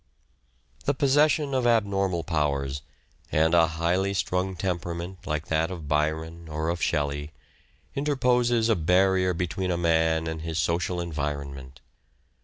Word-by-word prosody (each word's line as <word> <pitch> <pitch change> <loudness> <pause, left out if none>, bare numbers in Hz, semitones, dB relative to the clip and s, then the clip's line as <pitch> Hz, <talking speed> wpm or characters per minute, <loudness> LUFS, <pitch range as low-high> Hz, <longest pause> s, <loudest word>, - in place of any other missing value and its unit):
The 140 - +1
possession 145 +1 +3
of 130 -2 +2
abnormal 100 -6 +1
powers, 70 -3 -1 0.5
and 80 +2 +3
a 85 -1 +6
highly 85 +4 0
A - - -2
man - - -5
strung 95 0 -1
temperament 90 0 -4
like 75 0 -2
that 80 +1 +1
of 85 -5 -7
Byron 80 +2 -1
or 80 +1 -2
of 85 0 -2
Shelley, 75 0 -1 0.6
interposes 125 -5 +2
a 115 - +3
barrier 90 +2 +3
between 90 +2 -2
a 90 - 0
man 80 -1 +2
and 80 -1 -4
his 80 0 -4
social 85 +2 0
tlonal 85 - -1
environment. 70 -4 -5
85 Hz, 145 wpm, -26 LUFS, 80-95 Hz, 0.6 s, a